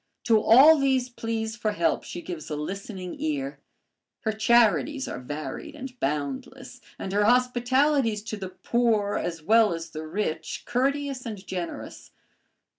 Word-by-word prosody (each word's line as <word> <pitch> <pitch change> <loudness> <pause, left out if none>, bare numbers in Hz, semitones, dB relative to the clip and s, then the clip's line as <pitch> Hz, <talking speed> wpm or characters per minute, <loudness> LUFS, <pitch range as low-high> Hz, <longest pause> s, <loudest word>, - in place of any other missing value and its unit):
To 220 -2 +4
all 285 +9 +8
these 265 -2 +1
pleas 225 -2 -3
for 215 -2 -1
help 170 -5 +1
she 175 - -7
gives 170 -4 -7
a 150 - -2
listening 185 - -6
ear. 285 -2 -2 0.6
Her 220 - 0
charities 235 +5 +3
are - - -5
varied 150 - -6
and 265 -3 -7
boundless, 140 -1 -4 0.2
and 190 - -5
her 205 +1 +3
hospitalities 250 0 +2
to 220 - -5
the 190 -2 -6
poor 210 +1 +1
as 165 -3 -4
well 215 0 +4
as 165 -1 -7
the 155 0 -6
rich, 160 -2 -3
courteous 270 +2 -1
and 210 -3 -7
generous. 180 -3 -6
220 Hz, 145 wpm, -26 LUFS, 180-250 Hz, 0.6 s, all